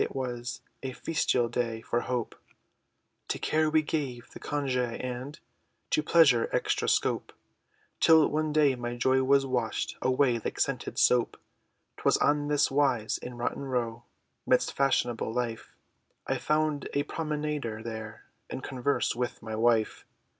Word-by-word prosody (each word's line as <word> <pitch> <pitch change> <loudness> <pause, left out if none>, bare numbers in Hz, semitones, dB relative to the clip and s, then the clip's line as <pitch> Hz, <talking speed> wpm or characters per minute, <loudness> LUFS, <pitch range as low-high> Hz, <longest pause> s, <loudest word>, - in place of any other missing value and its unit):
it - - -2
was 125 -1 -4 0.2
A 130 -1 -4
festal 125 -7 0
day, 115 -1 -2
for 120 +1 -1
hope, 125 -3 -2 0.9
To - - -2
care 155 0 +1
we 155 0 +3
gave 135 -6 -3
the - - -10
congè, 125 -5 -1
and 130 +3 -5 0.5
To - - +3
pleasure, 150 -7 +4
extra - - 0
scope, - - +1 0.7
Until 160 -2 +6
one 155 0 -1
day, 150 -2 +4
my 120 -1 -4
joy 130 +2 +2
was 135 +1 +3
washed 125 -4 -2
Away, 130 -2 +2
like - - -5
scented - - -1
soap! 125 -1 +3 0.6
'Twas - - +3
on 145 0 +2
this 145 -2 +2
wise, 135 -6 +1
In 125 -1 -8
Rotten 120 - -2
Row, 120 -3 -2 0.5
Midst - - +2
fashionable 120 -5 +1
life, 115 -1 -4 0.5
I - - -1
found 155 -1 0
a 145 - +2
promenader 150 -7 -3
there, 110 -1 -7 0.2
In 130 - -5
converse, 130 0 -1
with 125 +1 -3
my 110 0 -5
wife! 115 -1 +1
130 Hz, 145 wpm, -29 LUFS, 120-145 Hz, 0.9 s, Until